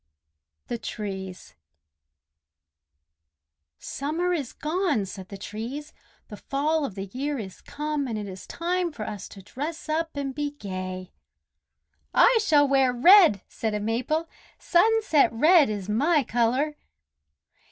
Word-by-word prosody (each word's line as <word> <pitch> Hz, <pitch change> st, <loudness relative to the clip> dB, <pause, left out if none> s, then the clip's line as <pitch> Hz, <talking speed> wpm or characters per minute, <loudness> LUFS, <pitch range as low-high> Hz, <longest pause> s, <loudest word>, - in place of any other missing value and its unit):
THE 235 Hz, -, -4 dB
TREES 190 Hz, -5 st, -6 dB, 2.2 s
"Summer 320 Hz, -, -2 dB
is 285 Hz, -8 st, -3 dB
gone!" 305 Hz, -, -1 dB
said 190 Hz, -1 st, -9 dB
the 200 Hz, -, -8 dB
Trees. 230 Hz, +9 st, -6 dB, 0.3 s
"The 210 Hz, -, -9 dB
fall 295 Hz, +5 st, 0 dB
of 215 Hz, -, -6 dB
the 195 Hz, -1 st, -4 dB
year 285 Hz, +3 st, -2 dB
is 195 Hz, -6 st, -8 dB
come, 300 Hz, -1 st, -3 dB
and 225 Hz, -3 st, -3 dB
it 205 Hz, -1 st, -5 dB
is 190 Hz, -1 st, -9 dB
time 350 Hz, 0 st, -1 dB
for 245 Hz, -8 st, -6 dB
us 210 Hz, -2 st, -6 dB
to 195 Hz, -, -12 dB
dress 300 Hz, -, -6 dB
up 320 Hz, -1 st, -1 dB
and 275 Hz, -1 st, -3 dB
be 290 Hz, +1 st, -3 dB
gay." 185 Hz, -6 st, -6 dB, 1.0 s
"I 475 Hz, -1 st, +6 dB
shall 295 Hz, -8 st, +4 dB
wear 270 Hz, -2 st, +3 dB
red!" 275 Hz, -, +6 dB
said 220 Hz, -2 st, -3 dB
a -, -, -1 dB
Maple. 250 Hz, +10 st, -1 dB, 0.3 s
"Sunset 395 Hz, -, +3 dB
red 305 Hz, +5 st, +5 dB
is 205 Hz, -3 st, -4 dB
my 285 Hz, +8 st, +2 dB
color." 250 Hz, +6 st, 0 dB
275 Hz, 130 wpm, -26 LUFS, 210-310 Hz, 2.2 s, I